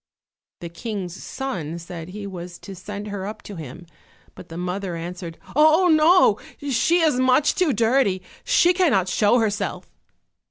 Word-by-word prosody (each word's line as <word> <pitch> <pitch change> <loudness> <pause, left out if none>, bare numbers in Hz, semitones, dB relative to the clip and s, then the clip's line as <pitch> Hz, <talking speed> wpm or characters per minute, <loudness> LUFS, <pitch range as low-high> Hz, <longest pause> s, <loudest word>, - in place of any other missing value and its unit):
The 170 - -6
King's 185 -1 -5
son 180 - -5
said 170 -1 -8
he 205 +2 -7
was 175 -2 -8
to 195 - -10
send 205 +3 -7
her 200 -1 -5
up 215 - -8
to 205 - -9
him; 160 +1 -9 0.5
but - - -13
the 165 - -8
mother 180 0 -3
answered, 170 0 -7 0.2
"Oh, 315 +4 +5
no, 320 +3 +5 0.3
she 330 +8 +3
is 305 -6 +2
much 255 +3 +3
too 360 -5 +1
dirty, 225 -4 +2 0.2
she 365 -8 +4
cannot 270 - +2
show 210 +5 +3
herself!" 215 -3 -2
205 Hz, 155 wpm, -23 LUFS, 180-270 Hz, 0.5 s, Oh